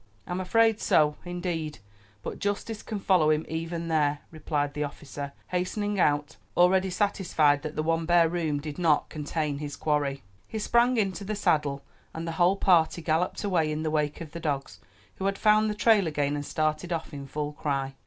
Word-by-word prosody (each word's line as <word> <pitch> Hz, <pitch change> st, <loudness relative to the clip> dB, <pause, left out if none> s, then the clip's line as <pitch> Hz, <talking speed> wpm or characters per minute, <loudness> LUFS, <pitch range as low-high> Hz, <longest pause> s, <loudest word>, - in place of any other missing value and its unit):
"I'm 180 Hz, +1 st, -3 dB
afraid 225 Hz, +3 st, +3 dB
so, 150 Hz, -1 st, +3 dB
indeed; 175 Hz, -5 st, -3 dB, 0.5 s
but -, -, -5 dB
justice 205 Hz, +2 st, -2 dB
can 215 Hz, -, -5 dB
follow 180 Hz, -6 st, +3 dB
him 155 Hz, 0 st, +2 dB
even 165 Hz, +1 st, -4 dB
there," 150 Hz, -3 st, +1 dB
replied 150 Hz, -2 st, -2 dB
the 150 Hz, -, -2 dB
officer, 140 Hz, -1 st, -6 dB, 0.2 s
hastening 200 Hz, +3 st, -1 dB
out, 145 Hz, -3 st, +1 dB, 0.2 s
already 185 Hz, +2 st, +4 dB
satisfied 175 Hz, -7 st, +2 dB
that 155 Hz, 0 st, -6 dB
the 155 Hz, -, -1 dB
one 165 Hz, 0 st, 0 dB
bare 175 Hz, -1 st, +5 dB
room 160 Hz, -4 st, -1 dB
did 150 Hz, +2 st, -7 dB
not 160 Hz, -4 st, +2 dB
contain 150 Hz, -1 st, -3 dB
his 145 Hz, -1 st, -5 dB
quarry. 145 Hz, -3 st, -1 dB, 0.2 s
He 220 Hz, -, -5 dB
sprang 235 Hz, +3 st, +3 dB
into 195 Hz, -2 st, 0 dB
the 210 Hz, +2 st, -3 dB
saddle, 150 Hz, -8 st, +1 dB, 0.3 s
and 165 Hz, +1 st, -4 dB
the -, -, -2 dB
whole 180 Hz, +3 st, +5 dB
party 170 Hz, -3 st, +3 dB
galloped 165 Hz, +5 st, 0 dB
away 170 Hz, -6 st, +1 dB
in 155 Hz, +1 st, -2 dB
the 155 Hz, -, -1 dB
wake 150 Hz, -1 st, -1 dB
of 160 Hz, -3 st, -8 dB
the 170 Hz, -, -6 dB
dogs, 145 Hz, -4 st, -3 dB, 0.4 s
who 190 Hz, -, -4 dB
had 195 Hz, 0 st, 0 dB
found 215 Hz, 0 st, +4 dB
the 210 Hz, -, -2 dB
trail 210 Hz, -4 st, +4 dB
again 145 Hz, -2 st, 0 dB
and 145 Hz, -1 st, -4 dB
started 155 Hz, +2 st, -1 dB
off 165 Hz, -2 st, -3 dB
in 140 Hz, -1 st, -7 dB
full 150 Hz, +1 st, -4 dB
cry. 135 Hz, -2 st, -2 dB
160 Hz, 190 wpm, -27 LUFS, 150-185 Hz, 0.5 s, bare